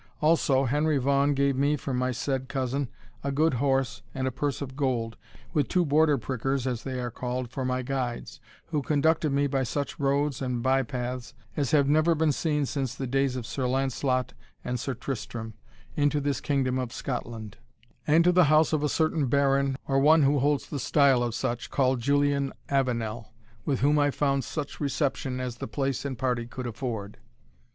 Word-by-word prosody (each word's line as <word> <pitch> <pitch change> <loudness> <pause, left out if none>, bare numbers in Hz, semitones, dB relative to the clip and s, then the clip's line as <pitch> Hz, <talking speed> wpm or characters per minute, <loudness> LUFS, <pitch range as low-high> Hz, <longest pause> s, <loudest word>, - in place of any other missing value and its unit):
Also, 150 -4 +3
Henry 150 +3 +2
Vaughan 140 +2 +2
gave 140 0 +2
me, 140 +3 +2
from 135 -2 -4
my 125 +1 0
said 130 +1 -2
cousin, 135 0 -1 0.3
a 140 - -1
good 155 +3 +2
horse, 135 -1 0
and 130 0 -1
a - - 0
purse 140 +1 -2
of 135 -2 -6
gold, 120 -5 -1 0.4
with 150 -5 +2
two 180 -1 +2
Border 150 0 +4
prickers, 130 +2 -2
as 125 -3 -2
they 130 -2 -4
are 120 -1 -3
called, 125 0 -4
for 130 - -3
my 130 0 -1
guides, 125 -2 -3 0.3
who 150 - 0
conducted 155 +2 +2
me, 140 +1 +2
by 135 -1 0
such 140 +3 -3
roads 140 -1 +1
and 125 -2 -2
by 135 +1 +3
paths 125 0 -5 0.2
as 140 -4 0
have 145 -3 +4
never 155 +3 +4
been 160 -1 +2
seen 150 0 0
since 135 -2 -3
the 135 - -4
days 135 +1 +1
of 125 -3 -4
Sir 130 +2 -2
Lancelot 130 -1 0 0.3
and 125 0 -2
Sir 130 +2 -3
Tristrem, 115 -3 -5 0.4
into 145 0 +2
this 140 -1 -1
kingdom 130 -3 0
of 125 -2 -3
Scotland, 115 -5 -5 0.5
and 160 +3 +5
to 180 - +5
the 180 -1 +5
house 155 +2 +4
of 155 - +2
a 150 - +1
certain 155 -2 +1
baron, 140 0 +2
or 135 0 +2
one 155 +2 +6
who 140 +1 +3
holds 145 +1 +1
the 145 - -4
style 140 -3 +4
of 120 -2 -1
such, 120 0 -2
called 130 -2 +2
Julian 140 +1 +1 0.2
Avenel, 115 -5 -1 0.3
with 135 -3 0
whom 145 +2 +4
I 145 0 +3
found 140 -1 0
such 150 -3 -5
reception 140 -2 -1
as 125 -2 -4
the - - -5
place 135 +5 -2
and 135 -3 -3
party 120 -2 -1
could 125 +1 -6
afford." 115 -4 -5
135 Hz, 190 wpm, -27 LUFS, 125-145 Hz, 0.5 s, one